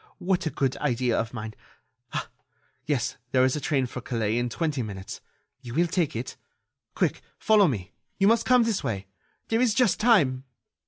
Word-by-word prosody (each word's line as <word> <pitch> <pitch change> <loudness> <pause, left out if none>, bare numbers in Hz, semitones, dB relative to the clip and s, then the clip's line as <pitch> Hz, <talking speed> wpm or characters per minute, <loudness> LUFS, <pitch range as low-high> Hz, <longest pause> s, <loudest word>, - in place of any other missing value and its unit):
What 180 -2 0
a - - +1
good 135 -3 -1
idea 125 -4 0
of 115 0 -1
mine!... 110 -2 -6 0.6
Ah! - - -3 0.6
yes, 135 -5 -1 0.2
there 130 -1 +5
is 130 - +1
a 150 - -3
train 135 -2 +1
for 125 +1 -6
Calais 115 -1 -1
in 120 0 -1
twenty 150 0 -1
minutes. 100 -4 -7 0.4
You 120 -1 -8
will 170 +3 +4
take 170 -5 -1
it.... 120 +3 -5 0.6
Quick, - - 0 0.2
follow 210 -2 +5
me... 100 - -3 0.3
you 195 - +3
must 230 +2 +4
come 250 -1 +5
this 225 -4 -1
way... 100 -3 -3 0.4
there 225 +1 +2
is 235 -4 +3
just 230 -6 +3
time." 165 - +3
135 Hz, 180 wpm, -26 LUFS, 120-190 Hz, 0.6 s, there